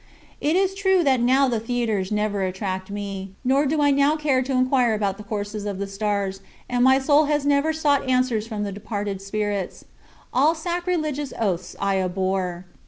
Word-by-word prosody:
It 305 Hz, +3 st, +1 dB
is 385 Hz, 0 st, +2 dB
true 380 Hz, -2 st, +2 dB
that 265 Hz, -4 st, +3 dB
now 260 Hz, +3 st, +4 dB
the 235 Hz, -3 st, 0 dB
theaters 225 Hz, -4 st, -1 dB
never 210 Hz, -1 st, 0 dB
attract 190 Hz, 0 st, -3 dB
me, 195 Hz, -1 st, -5 dB
nor 275 Hz, +3 st, +3 dB
do 295 Hz, +1 st, +1 dB
I 285 Hz, -, +4 dB
now 280 Hz, +2 st, +3 dB
care 290 Hz, -4 st, +1 dB
to 260 Hz, +1 st, -4 dB
inquire 255 Hz, -3 st, +2 dB
about 200 Hz, -2 st, -1 dB
the -, -, -7 dB
courses 205 Hz, 0 st, -4 dB
of 200 Hz, -2 st, -3 dB
the 200 Hz, -, -3 dB
stars, 195 Hz, -1 st, -2 dB, 0.3 s
and 245 Hz, 0 st, +1 dB
my 265 Hz, +1 st, +6 dB
soul 290 Hz, +3 st, +4 dB
has 295 Hz, -1 st, 0 dB
never 285 Hz, +2 st, +3 dB
sought 290 Hz, -4 st, +1 dB
answers 250 Hz, -4 st, +1 dB
from 215 Hz, -2 st, -3 dB
the 200 Hz, -, -3 dB
departed 205 Hz, -1 st, -4 dB
spirits. 205 Hz, -1 st, -3 dB, 0.5 s
All 295 Hz, +6 st, +4 dB
sacrilegious 320 Hz, -4 st, -2 dB
oaths 185 Hz, -5 st, -2 dB
I 195 Hz, -1 st, +1 dB
abhor. 185 Hz, -1 st, -2 dB
230 Hz, 180 wpm, -23 LUFS, 200-285 Hz, 0.5 s, my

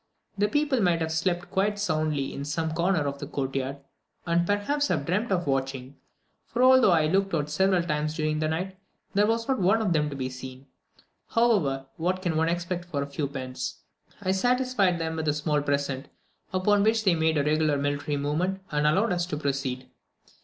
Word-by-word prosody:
The 205 Hz, +1 st, +2 dB
people 290 Hz, +1 st, +1 dB
might 175 Hz, -3 st, +3 dB
have 160 Hz, -1 st, -2 dB
slept 175 Hz, +2 st, -1 dB
quite 205 Hz, +2 st, +1 dB
soundly 155 Hz, -7 st, -1 dB
in 140 Hz, -, -5 dB
some 160 Hz, +2 st, -2 dB
corner 170 Hz, 0 st, +1 dB
of 140 Hz, 0 st, -3 dB
the 145 Hz, -, -6 dB
court 135 Hz, -2 st, -3 dB
yard, 135 Hz, +1 st, -2 dB, 0.5 s
and, 170 Hz, 0 st, +1 dB
perhaps, 280 Hz, +9 st, +1 dB
have 150 Hz, -5 st, -1 dB
dreamt 205 Hz, +7 st, -1 dB
of 175 Hz, -2 st, +1 dB
watching, 135 Hz, -1 st, -2 dB, 0.5 s
for 245 Hz, +1 st, 0 dB
although 260 Hz, -5 st, +7 dB
I 165 Hz, -2 st, +4 dB
had 155 Hz, -, 0 dB
looked 195 Hz, -1 st, +1 dB
out 150 Hz, -1 st, -2 dB
several 190 Hz, +2 st, +2 dB
times 150 Hz, -2 st, -1 dB
during 155 Hz, -1 st, 0 dB
the 155 Hz, -, 0 dB
night, 180 Hz, +5 st, -3 dB, 0.4 s
there 205 Hz, +1 st, +3 dB
was 230 Hz, +1 st, 0 dB
not 265 Hz, -3 st, +1 dB
one 195 Hz, +4 st, +3 dB
of 205 Hz, -6 st, +1 dB
them 150 Hz, -2 st, +1 dB
to 140 Hz, -, -6 dB
be 130 Hz, -1 st, -2 dB
seen; 130 Hz, +1 st, -9 dB, 0.7 s
however, 185 Hz, -, +2 dB
what 185 Hz, +3 st, -1 dB
can 170 Hz, -4 st, 0 dB
one 160 Hz, +1 st, +2 dB
expect 175 Hz, +1 st, -2 dB
for 145 Hz, -5 st, -2 dB
a 140 Hz, -, -9 dB
few 140 Hz, 0 st, -2 dB
pence? 130 Hz, -2 st, -6 dB, 0.4 s
I 185 Hz, -, +1 dB
satisfied 245 Hz, -3 st, +2 dB
them 160 Hz, -1 st, -3 dB
with 160 Hz, -1 st, -2 dB
a 150 Hz, -, +3 dB
small 150 Hz, 0 st, 0 dB
present, 140 Hz, -2 st, -1 dB, 0.4 s
upon 200 Hz, +2 st, +2 dB
which 220 Hz, +1 st, +2 dB
they 190 Hz, -4 st, +4 dB
made 160 Hz, -1 st, +1 dB
a 145 Hz, -, +2 dB
regular 150 Hz, 0 st, +2 dB
military 145 Hz, +1 st, -1 dB
movement, 160 Hz, +7 st, -1 dB
and 150 Hz, 0 st, +2 dB
allowed 195 Hz, +8 st, +2 dB
us 175 Hz, -1 st, -1 dB
to 150 Hz, -, -3 dB
proceed. 135 Hz, -3 st, -2 dB
160 Hz, 205 wpm, -27 LUFS, 145-190 Hz, 0.7 s, although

